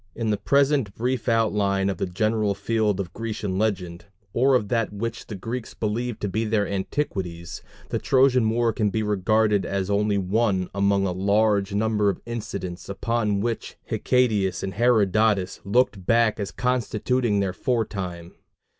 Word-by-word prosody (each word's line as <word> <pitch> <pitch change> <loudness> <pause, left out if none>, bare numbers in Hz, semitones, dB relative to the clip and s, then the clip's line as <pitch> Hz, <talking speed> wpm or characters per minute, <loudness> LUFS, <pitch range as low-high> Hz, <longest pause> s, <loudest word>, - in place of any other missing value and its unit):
In 115 -2 -1
the 105 - +1
present 135 -1 +2
brief 125 +2 -1
outline 105 -4 +2
of 100 - -1
the - - -2
general 105 +2 0
field 110 -3 0
of 90 -2 -4
Grecian 105 -4 -3
legend, 90 -5 -2 0.3
or 130 +3 +4
of 110 -5 +1
that 115 -4 0
which 115 +3 -5
the 105 - -6
Greeks 115 +5 -5
believed 115 +2 -2
to 105 - -1
be 110 +3 -1
their 110 -2 +1
antiquities, 95 - -3 0.3
the - - -1
Trojan 130 -4 +3
war 115 0 +1
can 105 -1 +1
be 110 +3 -1
regarded 105 0 +2
as 100 0 -2
only 105 0 +2
one 95 -1 0
among 100 0 +2
a 95 - 0
large 100 +1 +1
number 105 -1 +2
of 95 - -2
incidents 100 -7 -5
upon 105 0 -1
which 115 +1 -3
Hecatæus 110 -7 +1
and 95 - -3
Herodotus 110 -3 +2
looked 105 -2 +1
back 115 +2 +2
as 100 - -2
constituting 125 -2 0
their 95 -2 0
fore 115 +3 0
time. 90 -4 -6
105 Hz, 160 wpm, -24 LUFS, 100-115 Hz, 0.3 s, or